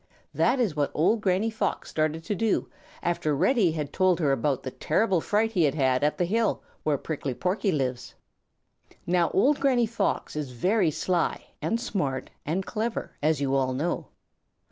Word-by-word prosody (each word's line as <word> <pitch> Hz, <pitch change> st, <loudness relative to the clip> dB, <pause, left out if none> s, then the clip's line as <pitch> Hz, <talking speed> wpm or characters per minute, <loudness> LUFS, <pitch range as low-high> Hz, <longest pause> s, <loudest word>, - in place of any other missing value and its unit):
That 255 Hz, +2 st, +2 dB
is 210 Hz, -11 st, +1 dB
what 145 Hz, -1 st, +1 dB
old 205 Hz, +8 st, +2 dB
Granny 200 Hz, +3 st, +1 dB
Fox 220 Hz, -, -2 dB
started 155 Hz, +1 st, -1 dB
to 210 Hz, -, -2 dB
do 220 Hz, +2 st, 0 dB, 0.4 s
after 155 Hz, -4 st, 0 dB
Reddy 200 Hz, -, +3 dB
had 150 Hz, -3 st, -4 dB
told 185 Hz, -2 st, +3 dB
her 150 Hz, -5 st, +2 dB
about 135 Hz, -1 st, 0 dB
the 130 Hz, -, -4 dB
terrible 185 Hz, -, +1 dB
fright 215 Hz, +5 st, +1 dB
he 190 Hz, -6 st, +1 dB
had 145 Hz, -, +1 dB
had 130 Hz, -2 st, +2 dB
at 150 Hz, -, +1 dB
the 175 Hz, -, +1 dB
hill 220 Hz, +5 st, 0 dB, 0.2 s
where 150 Hz, -2 st, +1 dB
Prickly 140 Hz, -3 st, -4 dB
Porky 190 Hz, -, 0 dB
lives. 130 Hz, -5 st, -2 dB, 0.9 s
Now 175 Hz, -1 st, +2 dB
old 280 Hz, +8 st, +3 dB
Granny 255 Hz, -4 st, +3 dB
Fox 215 Hz, -7 st, -2 dB
is 145 Hz, -4 st, -4 dB
very 185 Hz, -, +2 dB
sly 175 Hz, +3 st, -1 dB, 0.2 s
and 230 Hz, -, 0 dB
smart 180 Hz, -, -2 dB, 0.2 s
and 180 Hz, +5 st, -1 dB
clever, 225 Hz, +1 st, -3 dB
as 150 Hz, 0 st, +1 dB
you 135 Hz, -1 st, 0 dB
all 130 Hz, -1 st, +1 dB
know. 155 Hz, +7 st, -2 dB
175 Hz, 175 wpm, -27 LUFS, 145-215 Hz, 0.9 s, Reddy